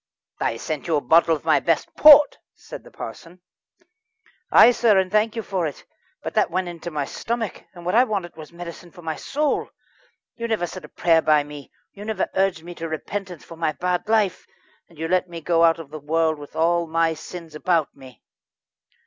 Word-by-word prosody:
"I 115 - -1
sent 155 +6 -5
you 165 - +1
a 145 - +1
bottle 165 +5 +4
of 150 - -10
my 160 -2 +4
best 165 -2 -1
port," 295 -1 +8 0.2
said - - -11
the - - -14
parson. 175 +2 -10 1.1
"Ay, 240 - +8
sir, 230 -4 +3
and 185 -1 +1
thank 215 +2 +2
you 225 - -3
for 185 -5 -1
it. 145 - -9 0.4
But - - -5
that 215 - +2
went 180 +1 -2
into 170 0 -7
my 150 -3 -3
stomick, 230 +3 -4
and 175 -1 -11
what 180 - -1
I 240 +3 +6
wanted 200 -8 -3
was 155 -1 -11
medicine 175 0 -9
for 175 0 -15
my 160 -1 -3
soul. 295 - -1 0.6
You 235 -1 -5
never 220 -6 0
said 185 +1 -9
a - - -14
prayer 165 -2 +3
by 150 -1 +3
me. 145 -1 -11 0.2
You 205 - -11
never 220 0 -2
urged 190 -4 0
me 175 +1 -8
to 165 - -3
repentance 180 +2 -6
for 165 - -12
my 160 -2 0
bad 180 +3 -2
life, 215 -4 +1 0.4
and 170 - -20
you 160 +1 -3
let 185 +1 +1
me 170 -1 -7
go 165 +1 +2
out 165 -1 +5
of 160 -3 -10
the 155 - -7
world 160 +1 0
with 145 - -12
all 170 +1 +1
my 165 0 +1
sins 165 0 -10
about 160 0 0
me." 130 -2 -15
170 Hz, 210 wpm, -23 LUFS, 160-190 Hz, 1.1 s, port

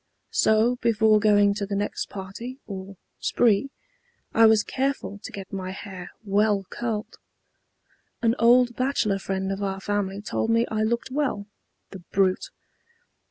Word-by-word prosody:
So 220 +3 +3
before 220 -2 +3
going 205 -1 +4
to 200 -1 -3
the 200 - -2
next 205 +1 -2
party 205 +7 -7
or 195 -1 -8 0.2
'spree,' 235 +2 +2 0.6
I 225 0 +7
was 220 -1 +5
careful 265 -6 -2
to - - -8
get 195 -1 -9
my 185 -1 -4
hair 190 -2 -8 0.2
well 205 0 +2
curled. 220 -2 -4 1.0
An 230 -1 +4
old 240 +1 +5
bachelor 255 -7 0
friend 190 0 -2
of 195 +1 -3
our 195 -1 -2
family 200 -1 -2
told 215 +2 -2
me 230 +1 +3
I 215 -1 0
looked 235 +3 -1
well. 260 -8 -1 0.5
(The 195 - -8
brute!) 185 +1 0
210 Hz, 145 wpm, -25 LUFS, 195-230 Hz, 1.0 s, I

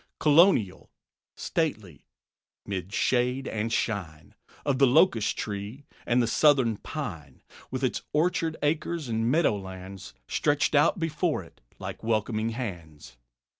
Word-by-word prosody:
Colonial, 150 - +4 0.5
stately; 110 - -3 0.6
'mid 95 -1 -4
shade 125 +5 +1
and 110 +1 -2
shine 90 -11 -3 0.3
Of 135 -2 +1
the 135 - +6
locust 125 - +3
tree 105 +7 -5 0.2
and 120 +1 +3
the - - 0
Southern 130 -5 +3
pine; 85 - -7 0.3
With 130 +1 -4
its 130 - 0
orchard 165 0 0
acres 155 -1 -1
and 115 +1 0
meadowlands 95 - -2
Stretched 145 0 +1
out 150 +5 +4
before 165 - -1
it 85 - -19 0.2
like - - -7
welcoming 110 0 0
hands. 85 - -7
120 Hz, 120 wpm, -27 LUFS, 100-150 Hz, 0.6 s, the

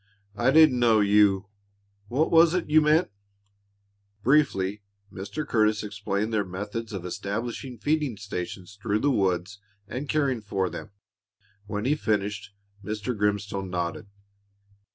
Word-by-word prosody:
"I 120 +4 +2
didn't 155 -3 +6
know 115 -2 +4
you 100 -1 +4 0.6
What 140 +8 0
was 165 +1 +6
it 170 -4 -2
you 155 +1 +7
meant?" 155 -3 +3 1.1
Briefly 105 -8 +2 0.3
Mr. 100 +11 -5
Curtis 110 -1 +2
explained 105 +1 -3
their 105 -2 +2
methods 105 +5 -5
of 95 -4 -5
establishing 115 +7 -4
feeding 145 -2 0
stations 100 -1 -6
through 105 -1 0
the 145 - +3
woods 95 -2 0 0.3
and 135 +6 -5
caring 140 -6 +1
for 95 -3 -2
them. - - -7 0.8
When 105 +1 -3
he 135 - +2
had 150 - 0
finished, 105 -1 -1 0.3
Mr. 105 +4 -3
Grimstone 100 -2 -1
nodded. 90 +3 -3
105 Hz, 135 wpm, -26 LUFS, 100-130 Hz, 1.1 s, you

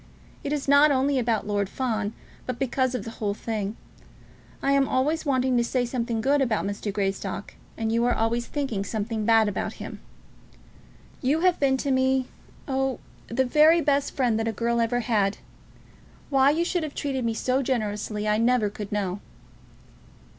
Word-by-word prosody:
It 285 - -3
is 295 -2 -2
not 285 +2 +6
only 275 0 +2
about 230 -3 0
Lord 205 -2 -1
Fawn, 220 -4 -2 0.3
but 255 -2 -3
because 260 0 0
of 235 - -3
the 225 - -7
whole 205 -1 0
thing. 215 -1 -3 0.9
I 275 - +2
am 275 -1 +3
always 300 +5 0
wanting 260 -2 +2
to 240 - +3
say 245 +1 0
something 235 -2 -2
good 280 +4 +2
about 235 -7 +1
Mr. 205 +1 -3
Greystock, 195 0 -3 0.2
and 225 -1 -1
you 230 +1 +2
are 245 - +2
always 235 +2 0
thinking 265 -9 -2
something 220 +1 -3
bad 225 -1 +5
about 205 - -2
him. - - -8 1.2
You 285 +5 +1
have 365 -1 +3
been 270 -2 +3
to 275 +1 -1
me, 260 0 +2 0.4
oh, 270 -1 0 0.3
the 260 +3 +1
very 305 +6 +5
best 285 -2 +1
friend 240 -5 +1
that 225 - -1
a - - +1
girl 235 +2 0
ever 245 +1 +1
had. 210 -4 +1 0.9
Why 270 0 +5
you 325 +4 +1
should 355 0 0
have 305 -3 -5
treated 270 -3 -2
me 230 -1 -1
so 255 +4 +1
generously 215 -4 -2
I 210 0 +2
never 230 -3 +2
could 205 -1 -7
know." 200 -2 -2
245 Hz, 175 wpm, -25 LUFS, 215-270 Hz, 1.2 s, not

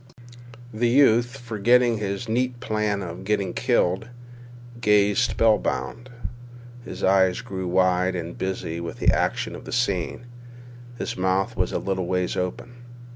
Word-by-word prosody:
The 120 +2 +1
youth, 120 -1 +4
forgetting 120 0 +2
his 100 +3 -3
neat 125 +2 -1
plan 105 -4 -1
of 85 +1 -7
getting 100 -2 -1
killed, 110 -4 +1 0.7
gazed 105 +1 +3
spell 110 -2 +3
bound. 120 +2 -3 0.7
His 95 -5 -8
eyes 95 -1 +3
grew 95 -1 -5
wide 90 0 +2
and 85 -1 -5
busy 90 -3 -3
with 85 -1 -6
the - - +3
action - - -1
of - - -10
the - - -8
scene. 120 -2 -1 0.7
His - - -4
mouth 95 +4 0
was 90 -2 0
a - - -1
little 95 -2 -2
ways 90 0 0
open. 90 +6 -4
100 Hz, 140 wpm, -24 LUFS, 95-120 Hz, 0.7 s, youth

